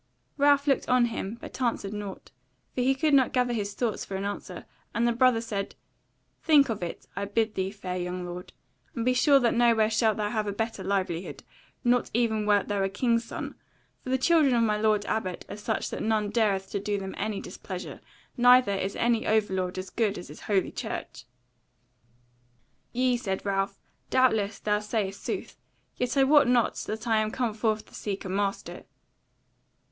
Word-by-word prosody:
Ralph 285 0 +4
looked 275 -2 +1
on 250 -1 +5
him, 215 +1 -4
but - - -9
answered 230 -5 -1
nought, 205 -2 -7 0.4
for 250 - -1
he 265 +2 +3
could 305 +2 +1
not 265 -3 +4
gather 250 -1 +2
his 205 -3 -3
thoughts 235 -4 -1
for 195 - -6
an 195 +1 -3
answer; 205 0 -6 0.3
and 235 +1 +2
the - - +3
brother 240 -1 +3
said: 210 -4 -4 0.7
"Think 290 -5 +5
of 215 -4 -3
it, 175 - -5
I 200 +2 -2
bid 220 +2 0
thee, 190 -1 -1
fair 190 -3 -5
young 180 0 -4
lord; 175 +1 -7 0.4
and 230 - -2
be 255 - +3
sure 275 +3 +5
that 240 -3 +2
nowhere 230 -2 +3
shalt 220 0 +2
thou 210 -1 -1
have 215 -2 -1
a - - 0
better 225 -1 -3
livelihood, 185 -2 -2 0.4
not 245 -1 +2
even 220 -3 +1
wert 205 -2 +3
thou 205 -1 -1
a 195 - +1
king's 230 +3 +1
son; - - -6 0.5
for - - -7
the 260 - +2
children 290 -2 +4
of 230 - +3
my 215 -2 +2
lord 210 -1 +2
Abbot 185 -5 -3
are - - -7
such 215 +1 -3
that - - -4
none 215 -2 0
dareth 200 -4 +1
to 200 - -1
do 205 +1 -1
them 190 -1 -5
any 215 -2 -2
displeasure; - - -7 0.3
neither 245 -3 +6
is 195 0 -2
any 235 -1 +1
overlord 190 -4 0
as 185 0 -5
good 215 -3 0
as 175 - -9
is 150 - -11
Holy 200 -3 0
Church." - - -6 1.7
"Yea," 250 0 +2
said 195 -6 -3
Ralph, 195 0 -1 0.3
"doubtless 220 -5 +2
thou 210 0 0
sayest 210 -2 -3
sooth; - - -5 0.4
yet 250 +2 -2
I 270 - +6
wot 285 0 +5
not 245 -2 +3
that 220 +2 -4
I 225 -1 +3
am 215 0 +1
come 235 -1 -1
forth 215 -1 -1
to - - -22
seek 200 -2 -4
a - - -4
master." 200 +1 -2
215 Hz, 190 wpm, -27 LUFS, 200-240 Hz, 1.7 s, neither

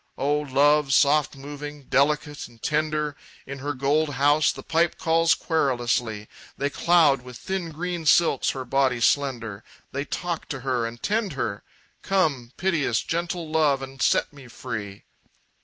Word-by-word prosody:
"O 145 +2 +1
love, 145 0 +3
soft 145 0 +3
moving, 145 +1 -8
delicate 145 +2 0
and 120 -1 -20
tender! 150 +1 -1 0.3
In 140 0 -7
her 145 +1 -3
gold 145 +2 +1
house 145 +3 +4
the - - -10
pipe 165 +1 +1
calls 165 0 +3
querulously, 120 -8 -1 0.3
They 140 +1 -1
cloud 160 -6 +4
with 125 -1 -10
thin 190 -3 -4
green 170 +1 -4
silks 160 -3 +4
her 130 -1 -4
body 135 -2 +1
slender, 115 -5 0 0.3
They 140 +2 -3
talk 170 +2 -4
to 135 -4 -4
her 125 -3 -1
and 115 +1 -10
tend 210 -4 0
her; 115 -6 -3 0.4
Come, 150 -11 0
piteous, 155 - 0
gentle 170 0 -3
love, 150 -4 +2
and 135 0 -9
set - - +2
me 140 -3 -13
free!" 110 -5 -7
145 Hz, 150 wpm, -25 LUFS, 130-155 Hz, 0.4 s, house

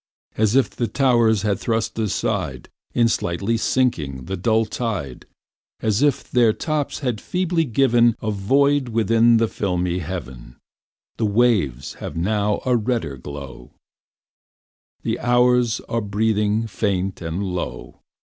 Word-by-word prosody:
As 110 +1 +2
if 135 - +3
the 120 - -2
towers 120 -6 +2
cast 110 +2 -1
aside 110 -4 -2 0.3
In 120 -1 +4
slightly 100 +1 -1
sinking, 80 - 0
the 95 - -3
dull 110 +4 +1
tide; 100 - -4 0.5
As 110 +1 0
if 145 -3 +2
their 120 -3 +4
tops 155 +2 -2
had 125 -6 -2
feebly 175 -2 0
given 120 -2 +3
A 110 - -2
void 135 +7 +2
within 115 +1 +4
the 115 0 +2
filmy 90 -3 -1
heaven. 65 -9 -7 0.6
The 110 - +1
waves 105 - +1
have - - -6
now 105 +3 0
a 125 -1 +3
redder 115 - -1
glow; 65 -2 -9 1.3
The - - -1
hours 120 -1 +3
are 115 - -3
breathing 105 +1 0
faint 100 -4 -2
and 85 +4 -3
low. 90 -2 -5
110 Hz, 130 wpm, -22 LUFS, 95-120 Hz, 1.3 s, In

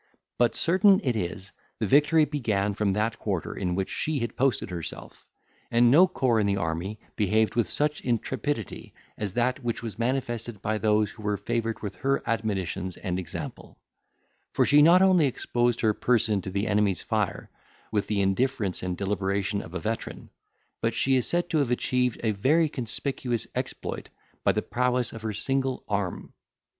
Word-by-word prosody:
But, 120 -1 +3
certain 190 +3 +4
it 125 -4 0
is, 95 0 -4 0.3
the 110 - -1
victory 150 - +5
began 110 -9 -1
from 100 -1 0
that 110 +3 -1
quarter 95 -6 -2
in 90 -2 -2
which 95 0 -2
she 155 -1 -1
had 120 -3 -3
posted 130 -7 0
herself; 85 -2 -7 0.4
and 120 +1 +4
no 175 +7 +7
corps 125 -9 +1
in 105 - +2
the 100 0 +1
army 85 +4 -3 0.2
behaved 110 +1 +2
with 120 -2 +1
such 150 0 0
intrepidity 120 0 -3 0.2
as 100 -3 -4
that 125 +3 0
which 120 -1 -2
was 110 -2 -6
manifested 120 -3 -2
by 110 +2 -1
those 105 -1 +2
who - - -13
were 105 -1 -1
favoured 115 0 -2
with 100 -3 -5
her 135 +5 0
admonitions 95 -5 -2
and 90 -1 -3
example; 90 - -7 0.8
for - - +3
she 145 +1 +6
not 175 +5 +7
only 185 -6 +5
exposed 120 -2 0
her 110 -2 +3
person 110 -3 +1
to 95 - -6
the 100 +2 -1
enemy's 105 -4 +1
fire, - - -2 0.4
with 105 -2 0
the 105 -2 0
indifference 100 0 0
and 90 -1 -3
deliberation 100 +1 -1
of 85 - -11
a - - -1
veteran, 110 +6 -5 0.5
but 115 0 0
she 135 +2 +3
is 125 - +2
said 175 0 +1
to 160 - +2
have 140 -4 +1
achieved 125 0 0
a 110 - +2
very 145 +11 +3
conspicuous 125 -1 -3
exploit - - -4 0.3
by - - +4
the - - -1
prowess 125 -1 0
of 115 - -8
her 110 -1 -2
single 135 +5 -1
arm. 100 -3 -3
115 Hz, 175 wpm, -27 LUFS, 100-130 Hz, 0.8 s, no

